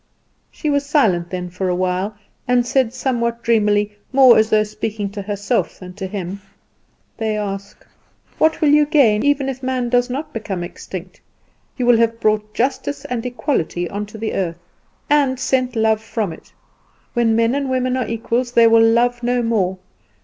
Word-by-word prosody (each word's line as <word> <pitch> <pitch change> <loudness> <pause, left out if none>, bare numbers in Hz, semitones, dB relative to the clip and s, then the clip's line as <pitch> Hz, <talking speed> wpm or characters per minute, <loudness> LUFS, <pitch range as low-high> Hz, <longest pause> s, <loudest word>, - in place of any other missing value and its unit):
She 305 - -3
was 285 0 +1
silent 215 - +1
then 180 -1 -5
for 185 +1 -2
a 180 - +1
while, 185 +3 -1 0.3
and 245 -1 +3
said 255 -2 +1
somewhat 235 -2 -2
dreamily, 210 -2 +2 0.2
more 260 -2 +7
as 220 0 +3
though 215 0 +4
speaking 210 -1 -4
to 200 0 -6
herself 205 0 -2
than 180 -1 -10
to 190 0 -5
him, 195 0 -5 0.8
"They 220 -2 -1
ask, 200 -1 -6 0.5
What 315 0 +2
will 305 - +4
you 295 0 +5
gain, 240 -9 +4
even 285 -1 +2
if 265 -1 -4
man 255 -2 -1
does 245 +1 +2
not 275 +5 -5
become 200 -5 -4
extinct? 180 +1 -9 0.6
you 250 - -1
will 240 -1 +5
have 230 0 +1
brought 215 -1 0
justice 275 +3 -2
and 245 -2 -3
equality 245 - -2
on 205 +1 -4
to 215 - -11
the 220 0 -3
earth, 170 -3 -2 0.5
and 280 -3 +2
sent 255 -2 0
love 220 -1 +2
from 220 -5 -3
it. - - -16 0.6
When 235 -2 +2
men 230 +1 +2
and 275 -1 -1
women 255 0 0
are 255 -2 -1
equals 235 +2 -2
they 235 -1 +6
will 230 0 +6
love 240 +2 +3
no 245 0 0
more. 195 -5 0
225 Hz, 180 wpm, -19 LUFS, 205-255 Hz, 0.8 s, more